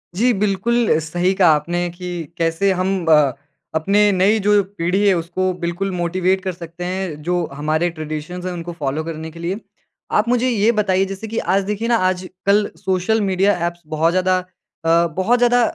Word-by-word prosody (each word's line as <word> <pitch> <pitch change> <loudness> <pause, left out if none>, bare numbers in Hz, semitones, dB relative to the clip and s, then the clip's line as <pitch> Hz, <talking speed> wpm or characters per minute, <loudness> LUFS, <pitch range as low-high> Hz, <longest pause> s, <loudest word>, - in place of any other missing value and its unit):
जी, 240 +6 +3
बिल्कुल 210 +1 +1
सही 175 +4 0
कहा 180 - +6
आपने 175 +4 -2
कि 175 -1 -6
कैसे 165 +4 +1
हम 185 -1 -1
अ, 150 -4 +5 0.4
अपने 200 +6 +3
नई 195 +4 +3
जो 205 0 +4 0.2
पीढ़ी 180 +5 +1
है 195 - +5
उसको 175 +2 -1
बिल्कुल 175 +2 -3
मोटिवेट 180 +2 0
कर 190 - -1
सकते 170 0 -9
हैं, 180 -4 -4
जो 175 0 0
हमारे 155 +4 0
ट्रेडिशंस 155 +2 -6
हैं 185 - -2
उनको 175 0 -6
फॉलो 145 +2 -2
करने 160 0 -6
के 165 - -12
लिए। 180 +5 -3 0.5
आप 210 - +2
मुझे 250 +1 +2
ये 225 -1 +3
बताइए 195 -4 +1
जैसे 195 +3 -6
कि 225 +1 -5
आज 195 +1 +1
देखिए 210 +3 -2
ना 240 - +3
आजकल 185 +3 0
सोशल 190 +4 0
मीडिया 195 0 +2
एप्स 175 0 -7
बहुत 160 +1 +1
ज़्यादा 185 0 +2 0.5
अ, - - +2 0.3
बहुत 230 +6 +3
ज़्यादा 245 0 +4
185 Hz, 180 wpm, -20 LUFS, 170-200 Hz, 0.5 s, कहा